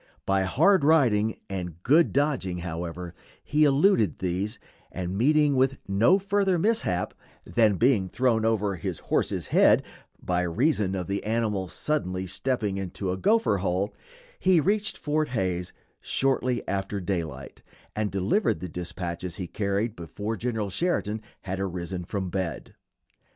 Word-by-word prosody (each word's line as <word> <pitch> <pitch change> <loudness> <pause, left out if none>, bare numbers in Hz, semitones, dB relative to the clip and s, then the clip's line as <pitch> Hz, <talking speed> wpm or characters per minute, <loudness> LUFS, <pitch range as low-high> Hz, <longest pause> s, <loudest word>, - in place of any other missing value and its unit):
By 95 -1 +2
hard 165 - +4
riding 120 -9 +3
and 90 -3 -6
good 155 +6 +4
dodging, 130 - 0
however, 85 +1 -5 0.3
he 150 +1 +3
eluded 140 - +3
these, 95 +4 -2 0.3
and 90 0 -4
meeting 145 +5 +3
with 135 0 +2
no 110 - +4
further 195 -1 +1
mishap 165 - 0 0.3
than 110 -4 +3
being 110 -4 +2
thrown 120 -2 +1
over 105 -4 +1
his - - -4
horse's - - -1
head - - +5 0.4
by 90 0 0
reason 100 - +1
of 90 -2 -3
the 100 +2 -3
animal 105 -3 -1
suddenly 95 - -2
stepping 100 +2 -2
into 95 0 -3
a 95 - -2
gopher 210 - +3
hole, 95 +2 -1 0.5
he 185 -3 +4
reached 205 +7 0
Fort 155 +1 0
Hays 95 -6 -2 0.3
shortly 130 -2 0
after 100 +1 -2
daylight, 80 -8 -4 0.3
and 105 -1 0
delivered 100 - +1
the 90 - -6
dispatches 90 0 -5
he 95 - -4
carried 100 +4 -1
before 105 +6 -5
General 110 -3 -2
Sheridan 110 - -1 0.2
had 95 0 -4
arisen 90 -1 -4
from 95 -1 -3
bed. 90 -7 -4
100 Hz, 140 wpm, -26 LUFS, 90-135 Hz, 0.5 s, head